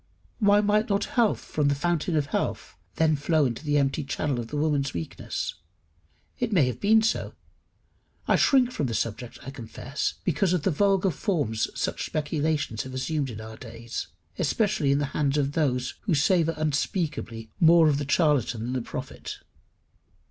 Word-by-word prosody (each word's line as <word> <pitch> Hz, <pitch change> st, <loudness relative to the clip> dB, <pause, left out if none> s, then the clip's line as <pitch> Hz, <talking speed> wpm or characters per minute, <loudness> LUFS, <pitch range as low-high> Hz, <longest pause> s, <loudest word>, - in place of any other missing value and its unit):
Why 205 Hz, -1 st, +5 dB
might 210 Hz, +1 st, +2 dB
not 200 Hz, 0 st, +1 dB
health 235 Hz, -4 st, +2 dB
from 150 Hz, -2 st, -1 dB
the 140 Hz, -, +2 dB
fountain 170 Hz, +3 st, 0 dB
of 145 Hz, -, +1 dB
health -, -, -3 dB, 0.2 s
flow 155 Hz, 0 st, +2 dB
then -, -, +3 dB
into 120 Hz, +5 st, -6 dB
the 145 Hz, -1 st, +1 dB
empty 140 Hz, +1 st, +1 dB
channel 140 Hz, -1 st, -2 dB
of 115 Hz, -, -4 dB
the 150 Hz, -, -4 dB
woman's 145 Hz, -, 0 dB
weakness? 85 Hz, -1 st, -4 dB, 0.9 s
It 245 Hz, -2 st, -1 dB
may 170 Hz, -9 st, +4 dB
have 125 Hz, -2 st, -3 dB
been 220 Hz, +2 st, +4 dB
so. 220 Hz, -, 0 dB, 0.9 s
I -, -, +4 dB
shrink 255 Hz, -3 st, +4 dB
from 145 Hz, -, -1 dB
the 115 Hz, -, -2 dB
subject, 115 Hz, +2 st, -3 dB
I 135 Hz, -, -7 dB
confess, 130 Hz, +2 st, -4 dB
because 175 Hz, +2 st, +1 dB
of 175 Hz, -5 st, 0 dB
the 190 Hz, -, +2 dB
vulgar 195 Hz, +3 st, +2 dB
forms 145 Hz, -, -1 dB
such -, -, -1 dB
speculations 150 Hz, -6 st, -1 dB
have 130 Hz, 0 st, -7 dB
assumed 140 Hz, +1 st, -1 dB
in 110 Hz, -3 st, -7 dB
our 110 Hz, 0 st, -9 dB
days, 115 Hz, -1 st, -6 dB, 0.3 s
especially 190 Hz, -4 st, +1 dB
in 140 Hz, -, +3 dB
the 145 Hz, -, 0 dB
hands 145 Hz, -1 st, +1 dB
of 140 Hz, -1 st, +1 dB
those 130 Hz, -5 st, 0 dB
who 185 Hz, -7 st, +2 dB
savour 165 Hz, +2 st, +2 dB
unspeakably 150 Hz, -, -2 dB
more 165 Hz, -1 st, +6 dB
of 145 Hz, -2 st, +2 dB
the 140 Hz, -2 st, -4 dB
charlatan 140 Hz, -8 st, +2 dB
than 125 Hz, +2 st, -3 dB
the 130 Hz, -, -1 dB
prophet. -, -, -7 dB
150 Hz, 175 wpm, -26 LUFS, 130-175 Hz, 0.9 s, more